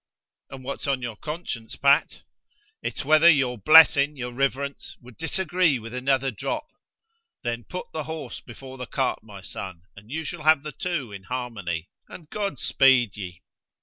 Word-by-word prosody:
'And 135 -1 -9
what's 140 +2 -4
on 135 -2 0
your 120 -2 -4
conscience, 150 -5 -6
Pat? 140 +2 +3 0.6
It's - - -4
whether 155 +3 +7
your 130 -6 +3
blessing, 150 +3 +7
your 125 -1 -5
Riverence, 140 +1 -2
would 125 -1 -15
disagree 170 -2 +1
with 115 0 -9
another 135 +1 +1
drop. 310 - -3 0.8
Then 120 -1 -3
put 180 - -6
the 155 -2 -3
horse 160 -5 -6
before 130 +2 -11
the 125 - -5
cart, 135 -2 -1
my 105 -3 -12
son, 95 -2 -7
and 105 +2 -15
you 160 +4 -3
shall 170 +2 -5
have 155 -1 +4
the 155 - -5
two 150 -7 -3
in 95 -2 -9
harmony, 100 -10 -4 0.2
and 160 -4 -12
God 200 -8 -2
speed 130 -5 +4
ye!' 90 -4 -8
135 Hz, 165 wpm, -25 LUFS, 120-155 Hz, 0.8 s, whether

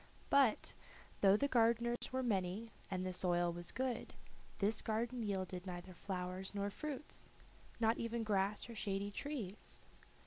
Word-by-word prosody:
But, 270 -6 +5 0.5
though 195 0 +7
the 280 - +2
gardeners 235 -1 +3
were 260 0 0
many 205 0 0 0.2
and 185 -1 -1
the 185 - -2
soil 175 -1 +2
was 175 0 -6
good, 255 -2 -2 0.4
this 210 +2 +2
garden 235 +3 -1
yielded 190 -3 -2
neither 180 0 -6
flowers 185 +1 -4
nor 200 0 0
fruits, 295 +3 -5 0.5
not 225 0 +3
even 230 0 -1
grass 200 -1 +1
or 235 - -7
shady 200 -2 -1
trees. 220 -6 -5
205 Hz, 140 wpm, -38 LUFS, 185-235 Hz, 0.5 s, though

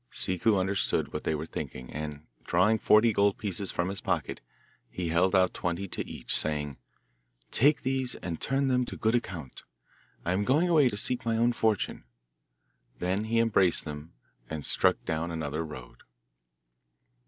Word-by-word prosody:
Ciccu 95 +3 +1
understood 95 +1 0
what - - -4
they 80 - +1
were 75 +1 -4
thinking, 65 -5 -7
and, 75 0 -6 0.2
drawing 105 +6 +3
forty 110 +2 +5
gold 100 0 +3
pieces 100 -2 -3
from 85 +1 -1
his 95 0 -5
pocket, - - -2 0.5
he 90 -2 -4
held 90 +4 +3
out 95 -1 +4
twenty 90 +3 -2
to - - -3
each, - - -2
saying, 75 -2 -1 0.7
'Take 145 +5 +4
these 130 -1 0
and 85 -2 -6
turn 135 +1 +1
them 125 -1 +2
to - - -7
good 110 +1 +1
account. 90 - -3 0.6
I 90 - +1
am 100 +2 +1
going 145 - +3
away 155 -7 +5
to 105 - -5
seek 125 +3 0
my 115 -1 0
own 120 +1 +3
fortune.' 110 -3 0 0.9
Then 95 +4 -1
he 115 +1 0
embraced 100 -6 +3
them, 75 +1 -8 0.4
and 80 -2 -5
struck - - +2
down 80 +2 -2
another 80 -1 -3
road. 65 -6 -10
95 Hz, 165 wpm, -29 LUFS, 80-115 Hz, 0.9 s, forty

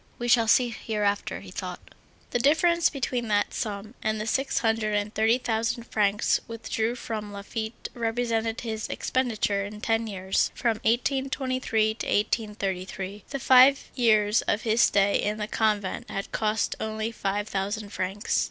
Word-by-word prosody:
—"We 240 - -3
shall 235 -2 +4
see 245 +2 +4
hereafter," 210 -3 -2
he - - -11
thought. - - -7 0.4
The 245 - +1
difference 335 +6 +4
between 250 -4 -2
that 205 -1 +1
sum 210 +1 -4
and 215 0 -1
the 215 - -3
six 270 +4 0
hundred 220 -2 +1
and 205 +1 -1
thirty 220 +2 +3
thousand 230 -1 -1
francs 210 -3 +1
withdrawn 230 0 -2
from 220 -4 -5
Laffitte 220 +3 -5
represented 230 -1 -1
his 220 -2 -4
expenditure 220 -6 0
in 205 +1 -7
ten 225 +1 0
years, 190 -2 0
from 230 -3 0
1823 255 -1 0
to 220 - -6
1833. 200 -2 -2
The 275 - -3
five 260 +1 +5
years 215 -3 +3
of 205 - +1
his 225 +1 +2
stay 200 0 +4
in 210 +1 -1
the 210 - -2
convent 215 +1 -1
had 195 -1 -4
cost 215 0 0
only 220 +1 -3
five 205 -1 -2
thousand 205 +1 -3
francs. 195 +4 -1
220 Hz, 150 wpm, -26 LUFS, 205-235 Hz, 0.4 s, five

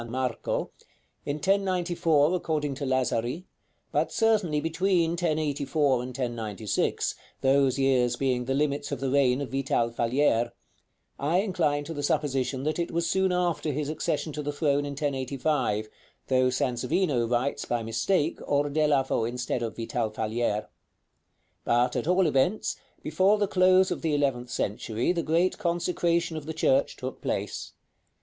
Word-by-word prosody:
Marco," 125 -1 -2 0.6
in 145 - 0
1094 175 -3 +2
according 155 -5 -1
to 140 +1 -4
Lazari, 130 +4 0 0.5
but - - 0
certainly 215 -9 +2
between 165 +1 +1
1084 150 -5 0
and 125 - -5
1096, 115 -5 -2 0.3
those 135 0 +3
years 130 -3 +2
being 125 -2 0
the 135 +1 0
limits 145 0 -1
of 140 - -2
the 135 -1 -1
reign 135 -1 +3
of 130 -5 -5
Vital 135 -3 0
Falier; 120 0 +1 0.7
I 165 +6 +2
incline 150 -8 0
to 165 +3 -6
the 145 - -4
supposition 135 -2 0
that 155 +3 -1
it 170 - -1
was 170 0 -1
soon 190 +2 +2
after 175 -3 0
his 145 +1 -2
accession 155 0 -2
to 150 - -4
the 145 0 -2
throne 145 -1 +1
in 145 - -4
1085, 135 -5 -1 0.4
though 130 -1 +3
Sansovino 125 +1 0
writes, 125 +4 -1
by 120 -1 -1
mistake, 145 - 0
Ordelafo 145 -3 +1
instead 120 +1 -2
of 115 -2 -4
Vital 115 0 -2
Falier. 110 0 -1 1.0
But, 120 +1 +2
at - - -2
all 180 +1 +3
events, 155 +7 +1 0.3
before 185 +7 +3
the 205 -1 +1
close 185 0 +4
of - - -2
the 160 -3 0
eleventh 130 -4 0
century 110 - -1
the 175 -2 0
great 165 +4 +1
consecration 170 -1 0
of 150 -1 -7
the 160 - -4
church 140 -3 +2
took 130 0 -6
place. - - -3
145 Hz, 145 wpm, -27 LUFS, 125-165 Hz, 1.0 s, close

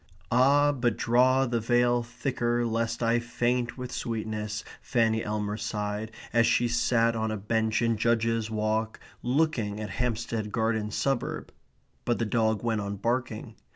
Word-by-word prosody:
Ah, 140 +4 +5
but 120 -5 0
draw 130 +3 +3
the 120 -2 0
veil 120 +1 +2
thicker 120 0 -1
lest 115 +1 -1
I 115 +1 +3
faint 120 +1 -1
with 125 -1 -6
sweetness, 110 -2 -3 0.2
Fanny 115 -3 +1
Elmer 105 -1 -2
sighed, 105 0 -3 0.2
as 115 -1 +4
she 120 - +3
sat 115 -1 +2
on 110 0 -1
a 110 - -2
bench 110 +2 0
in 115 -1 +2
Judges 115 0 +1
Walk 110 0 -1 0.2
looking 125 -6 0
at 105 -2 -5
Hampstead 115 -3 -2
Garden 110 -1 0
Suburb. 135 +3 -2 0.5
But 120 - 0
the 115 - 0
dog 110 -1 +1
went 110 -3 0
on 100 0 -3
barking. 115 +2 -2
115 Hz, 150 wpm, -28 LUFS, 110-120 Hz, 0.5 s, Ah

